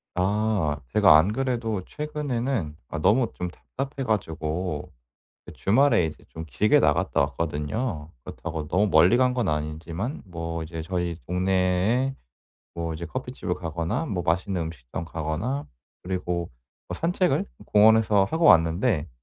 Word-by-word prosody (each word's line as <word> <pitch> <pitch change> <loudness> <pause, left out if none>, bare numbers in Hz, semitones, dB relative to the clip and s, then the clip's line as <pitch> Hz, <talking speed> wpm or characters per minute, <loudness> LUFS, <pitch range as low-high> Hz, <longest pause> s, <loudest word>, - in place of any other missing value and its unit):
아 95 -5 +1 0.2
제가 - - +7
안 90 +7 +3
그래도 115 -5 -1
최근에는 135 - -3
아 85 - -4
너무 115 +8 +3
좀 90 - -4
답답해 135 +9 -6
가지고 80 -6 -2 0.6
예 - - -9
주말에 115 -3 +3
이제 80 - -7
좀 80 - -7
길게 80 +9 +3
나갔다 - - +2
왔거든요. 75 - -2
그렇다고 80 0 -6
너무 100 +6 +2
멀리 90 +4 +6
간 125 0 +3
건 125 -5 0
아니지만 80 - -3
뭐 85 -2 -5
이제 80 0 -6
저희 85 0 -2
동네에 95 +7 +1 0.6
뭐 85 -1 -3
이제 85 +2 -6
커피집을 125 -4 -4
가거나 85 - -2
뭐 90 -8 -2
맛있는 90 +3 0
음식점 80 -1 -6
가거나 80 - -3 0.4
그리고 90 -2 -2 0.4
뭐 - - -4
산책을 180 +2 +1 0.2
공원에서 105 -1 +5
하고 160 +11 -1
왔는데 85 - +4
90 Hz, 295 characters per minute, -25 LUFS, 80-115 Hz, 0.6 s, 제가